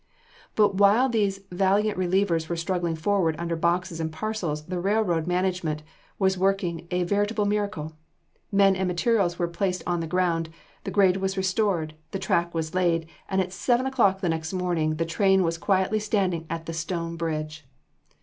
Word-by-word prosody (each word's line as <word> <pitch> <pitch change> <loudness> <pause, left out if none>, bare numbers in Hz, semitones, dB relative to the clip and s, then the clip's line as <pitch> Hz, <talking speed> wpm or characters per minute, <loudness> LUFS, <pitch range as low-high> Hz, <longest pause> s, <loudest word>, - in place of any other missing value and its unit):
But 205 -3 +3
while 210 +6 +5
these 200 -4 0
valiant 200 +3 +2
relievers 180 -3 +1
were 170 - -1
struggling 170 0 -1
forward 165 -1 +1
under 170 0 -2
boxes 170 +1 0
and 160 -1 -2
parcels, 165 -5 -3
the 180 +1 -3
railroad 185 -4 +1
management 180 -4 -1 0.3
was 190 -1 +1
working 185 -3 0
a 180 0 0
veritable 205 +3 0
miracle. 200 -7 -2 0.6
Men 195 -1 +5
and 190 0 -1
material 190 +2 +2
were 175 - 0
placed 180 +2 -2
on 175 -1 0
the 165 - -3
ground, 165 -1 0 0.4
the - - -2
grade 190 -2 +4
was 190 0 -2
restored, 190 -4 0 0.2
the - - -3
track 170 -2 0
was 160 -1 -3
laid, 170 -3 +1 0.2
and 190 0 +2
at 185 0 -4
seven 245 +6 +1
o'clock 215 -8 +2
the 180 - 0
next 160 +1 -2
morning 175 -4 0
the 165 +1 -1
train 190 +3 +3
was 165 -1 -1
quietly 195 +3 +1
standing 190 -6 -1
at 165 -1 -4
the 165 - -5
Stone 165 +1 -3
Bridge! 155 -3 -4
180 Hz, 170 wpm, -26 LUFS, 165-195 Hz, 0.6 s, while